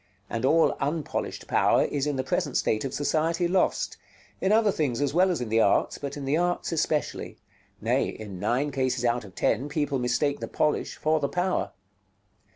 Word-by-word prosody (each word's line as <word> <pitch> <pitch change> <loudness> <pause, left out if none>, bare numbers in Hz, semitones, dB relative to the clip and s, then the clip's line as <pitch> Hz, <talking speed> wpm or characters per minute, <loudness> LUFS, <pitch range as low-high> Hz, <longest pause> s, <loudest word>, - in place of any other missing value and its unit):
And 115 +2 -1
all 160 +4 +4
unpolished 150 +2 -3
power - - +3
is 145 0 -1
in 145 - 0
the 130 - -1
present 130 - -1
state 110 - 0
of 135 - -3
society 165 +4 0
lost; 185 +1 0 0.4
in 190 - +2
other 215 -1 +4
things 140 -10 -1
as 145 -1 0
well 185 +3 +4
as 175 -7 -1
in 120 - -3
the 110 +1 +3
arts, 100 - +2
but 140 0 -5
in 140 - -5
the 140 +3 +1
arts 175 +1 0
especially: 155 -2 -1 0.4
nay, - - +1
in 100 -4 -7
nine 125 +8 0
cases 130 -2 0
out 120 0 +1
of 100 -2 -13
ten, 130 +7 0
people 145 -2 -1
mistake 125 +4 0
the - - -4
polish 150 - 0
for 155 +1 +1
the 140 - -1
power. 180 +1 -1
145 Hz, 190 wpm, -26 LUFS, 125-160 Hz, 0.4 s, all